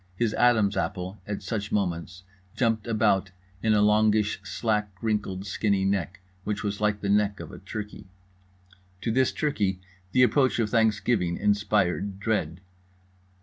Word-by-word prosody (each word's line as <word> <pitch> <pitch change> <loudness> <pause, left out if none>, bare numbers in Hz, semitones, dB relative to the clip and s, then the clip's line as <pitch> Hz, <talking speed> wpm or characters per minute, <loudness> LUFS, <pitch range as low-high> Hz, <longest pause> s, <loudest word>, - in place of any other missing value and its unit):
His 110 +2 0
adam's 110 -4 +3
apple, 95 0 -3
at 105 -1 -4
such 100 +1 -3
moments, 90 -2 -2 0.3
jumped 115 -3 0
about 105 -4 +2 0.3
in 110 -1 +3
a 105 - +4
longish 105 0 +3
slack 105 -3 -1
wrinkled 100 -4 -2
skinny 100 -1 0
neck 95 -1 -1 0.2
which 105 0 -3
was 100 0 -3
like 105 -1 +1
the 100 - -2
neck 100 -1 +2
of 85 -2 -8
a - - -10
turkey. 105 -2 -7 0.9
To 115 - -1
this 130 +2 +2
turkey 105 -11 -1 0.3
the 125 - +5
approach 130 +2 +3
of 110 -3 0
Thanksgiving 110 -5 +1
inspired 100 -2 0
dread. 95 -6 -1
105 Hz, 145 wpm, -26 LUFS, 95-110 Hz, 0.9 s, the